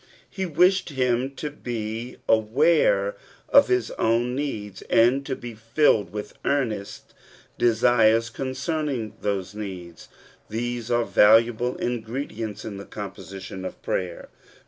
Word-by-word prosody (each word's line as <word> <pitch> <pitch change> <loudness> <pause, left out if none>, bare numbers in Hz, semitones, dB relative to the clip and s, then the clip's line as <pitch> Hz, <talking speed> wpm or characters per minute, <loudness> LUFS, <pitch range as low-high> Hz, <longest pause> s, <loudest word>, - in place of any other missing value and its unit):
'* - - -29
He 190 -1 -3
wished 180 +4 +3
him 130 -1 0
to 150 +1 -4
be 115 -2 -5
aware 110 -2 +3 0.3
of - - +7
his 125 -2 +1
own 120 +2 +2
needs, 110 -8 -4
and 125 +4 +4
to 135 - -1
be 120 -2 -8
filled 115 - +2
with 105 0 -6
earnest 115 -8 -2 0.5
desires 115 -1 +4
concerning 135 -3 -3
those 100 -2 -2
needs: 95 -5 -8 0.4
these 120 +1 -3
are 120 -1 +2
valuable 115 +3 +4
ingredients 115 -3 -4
in 105 -3 -6
the 100 - -8
composition 95 -1 -8
of 95 - -6
prayer. 90 -2 -3
115 Hz, 125 wpm, -24 LUFS, 105-130 Hz, 0.5 s, of